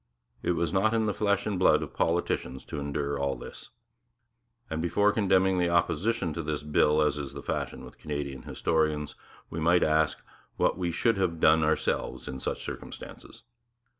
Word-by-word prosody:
It - - +1
was 85 -1 -1
not 110 +4 +3
in 110 -1 +2
the 105 - 0
flesh 100 -1 +1
and 100 -4 -1
blood 95 - +4
of - - -8
politicians 75 -6 -1
to 75 - -5
endure 70 0 -2
all 70 -1 0
this; - - -10 1.0
and 80 -4 -3
before 100 +5 +3
condemning 95 -3 +3
the 90 -1 +2
opposition 85 +2 +1
to 85 - -3
this 75 -2 -3
bill, 75 0 +3
as 75 -1 0
is 70 -2 -6
the - - -8
fashion - - -3
with - - -14
Canadian 70 -3 -4
historians, 75 +1 0 0.4
we 80 - -4
might 85 +2 +4
ask 80 0 +2 0.4
what - - +2
we 90 -2 -2
should 100 +6 +1
have 90 -4 0
done 80 0 +5
ourselves 80 0 -1
in 65 - -5
such - - -3
circumstances. - - -9
80 Hz, 175 wpm, -28 LUFS, 75-95 Hz, 1.0 s, done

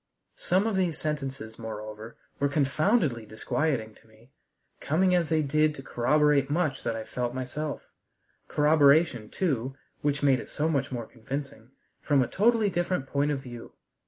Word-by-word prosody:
Some 185 +4 +2
of 225 -3 0
these 180 -4 0
sentences, 135 -7 -4
moreover, 110 0 -7 0.2
were 140 - +2
confoundedly 145 - +1
disquieting 110 +1 -2
to 110 - -22
me, 110 +4 -22 0.5
coming 180 +5 +2
as 175 -3 +2
they 160 -1 +2
did 155 +2 +2
to 135 - -8
corroborate 145 +2 +2
much 155 -1 0
that 115 -1 -2
I 110 - -4
felt 125 +2 -3
myself: 140 +4 -4 0.6
corroboration, 150 -5 +4
too 135 -7 -1 0.3
which 145 0 0
made 135 -3 +4
it - - -9
so 150 - -1
much 140 -5 0
more 120 -3 -4
convincing 130 0 -7 0.3
from 140 -3 +3
a - - -3
totally 220 0 +2
different 175 -4 -1
point 140 +2 0
of 140 -2 -1
view. 120 -3 -10
140 Hz, 160 wpm, -27 LUFS, 120-155 Hz, 0.6 s, corroboration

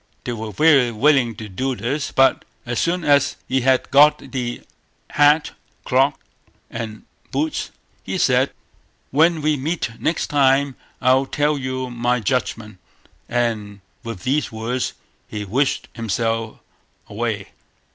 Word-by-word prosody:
They - - -3
were 110 -1 -5
very 135 - +4
willing 125 0 +3
to 110 +1 -8
do 130 +7 -2
this; 130 +3 -3
but 135 -1 +3 0.2
as 120 -1 -2
soon 175 +1 0
as 145 -2 +3
he 130 +1 +1
had 130 0 +2
got 145 +2 +5
the 120 -3 -3 0.5
hat; 150 +1 +4 0.3
cloak, 135 +2 +3 0.6
and 110 -2 -6 0.3
boots, 150 +3 -2 0.3
he - - -4
said: - - +3 0.6
"When 160 +2 +3
we 150 -1 +2
meet 150 -2 -2
next 165 - 0
time 140 -1 +3 0.3
I'll 130 +1 +3
tell 150 +2 +1
you 130 -2 -4
my 120 +1 0
judgment"; 110 -3 -2 0.5
and 110 -4 -2 0.2
with 115 -6 -7
these 140 +3 0
words 115 +3 -2 0.3
he 105 -1 -5
wished 130 +8 0
himself 115 0 -2 0.5
away. 105 -2 -3
130 Hz, 130 wpm, -21 LUFS, 115-145 Hz, 0.6 s, got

